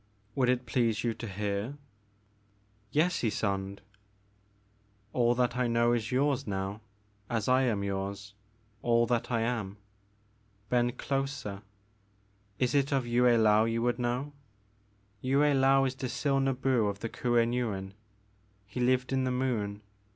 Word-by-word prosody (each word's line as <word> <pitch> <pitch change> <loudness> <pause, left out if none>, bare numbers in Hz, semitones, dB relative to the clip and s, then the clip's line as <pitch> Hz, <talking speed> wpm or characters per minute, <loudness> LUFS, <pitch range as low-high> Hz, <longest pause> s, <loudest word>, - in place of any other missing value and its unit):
Would 125 0 +2
it 125 0 +1
please 115 -2 0
you 120 -1 0
to 115 +1 -7
hear? 100 +6 -3 0.3
' 105 0 -38
* 100 0 -38 0.3
'*Yes, 170 +4 +2
Ysonde." 100 -3 -2 1.3
All 120 -1 +3
that 125 -1 +1
I 125 -1 +1
know 120 0 +3
is 110 -2 -1
yours, 135 0 +1
now, 95 +1 -3 0.5
as 115 -4 -1
I 130 +1 +4
am 105 -5 0
yours, 100 +1 -4 0.5
all 120 0 +3
that 120 -1 -1
I 115 -2 +1
am. 115 -4 -2 0.9
Bend 120 -1 +1
closer. 135 -7 -3 1.0
Is 125 -1 +1
it 140 -1 +2
of 135 -3 +1
Yue 120 +1 +2
I^ou 110 -2 +4
you 115 0 -1
would 120 0 0
know? 125 +4 -2 0.9
Yue 130 +2 +1
Laou 135 -2 +4
is 130 - -1
Dzil 135 +1 0
Nbu 130 -5 +1
of 100 0 -6
the 115 - -2
Kuen 120 -1 +1
Yuin. 100 -6 -2 0.7
He 110 - -7
lived 125 +1 +1
in 130 0 +1
the 130 - 0
Moon. 115 -5 -2
120 Hz, 145 wpm, -30 LUFS, 105-130 Hz, 1.3 s, I